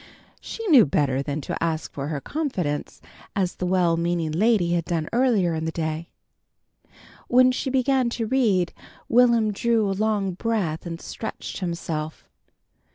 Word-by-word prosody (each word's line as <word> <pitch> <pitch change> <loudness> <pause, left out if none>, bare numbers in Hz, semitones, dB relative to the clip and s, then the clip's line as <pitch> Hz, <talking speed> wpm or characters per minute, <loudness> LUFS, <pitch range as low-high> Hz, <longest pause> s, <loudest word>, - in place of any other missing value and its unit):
She 455 - -7
knew 260 - +7
better 135 -1 +1
than 145 +1 -3
to 145 - -4
ask 160 -1 -2
for 140 0 -4
her 150 -2 -3
confidence 180 - -3 0.3
as 185 -3 0
the 180 - -2
well 175 -2 +2
meaning 170 -1 -1
lady 185 0 +2
had 170 -2 0
done 165 -3 -2
earlier 230 -9 +2
in 160 0 -2
the 160 - -1
day. 160 +1 -3 1.2
When 255 +1 +5
she 260 +1 -2
began 260 -1 +2
to 230 - -1
read, 215 -8 +1 0.3
Will'm 235 -3 +4
drew 225 0 +1
a 195 - 0
long 205 -1 0
breath 180 -6 -2
and 165 -1 -5
stretched 220 - -6
himself. 165 -4 -4
180 Hz, 155 wpm, -24 LUFS, 160-230 Hz, 1.2 s, knew